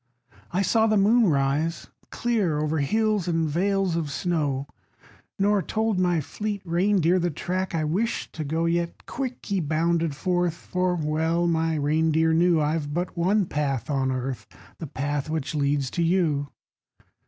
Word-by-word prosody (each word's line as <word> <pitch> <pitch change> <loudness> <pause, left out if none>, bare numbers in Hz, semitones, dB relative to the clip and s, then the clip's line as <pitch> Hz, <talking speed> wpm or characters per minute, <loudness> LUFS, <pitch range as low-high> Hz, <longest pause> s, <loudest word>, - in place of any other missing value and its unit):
I 185 +3 +1
saw 220 +4 +3
the 215 -1 +3
moon 215 +2 +4
rise 145 +3 0 0.2
clear 210 -10 0
O'er 155 +1 0
hills 215 +5 +1
and 165 -2 +1
vales 190 +3 +1
of 165 -3 -2
snow 145 -4 -1 0.7
Nor 200 0 +2
told 220 0 -1
my 175 -3 +2
fleet 205 +6 -4
reindeer 180 0 +2
The 175 0 0
track 185 +4 -3
I 160 - 0
wished 195 +10 -1
to 155 - -4
go. 160 +3 -1
Yet 170 0 -1
quick 255 -2 -5
he 200 -2 0
bounded 165 0 0
forth; 175 +1 0
For 180 +1 -1
well 160 +2 0
my 165 -1 +1
reindeer 160 +2 +2
knew 170 0 +4
I've 150 -1 -1
but 175 +1 -2
one 190 +4 +2
path 140 -5 -2
on 135 -2 +1
earth 130 0 -4 0.3
The 160 - -5
path 145 +2 -3
which 155 -1 -2
leads 140 -2 0
to 170 - -2
you. 165 -5 +1
165 Hz, 155 wpm, -25 LUFS, 150-185 Hz, 0.7 s, moon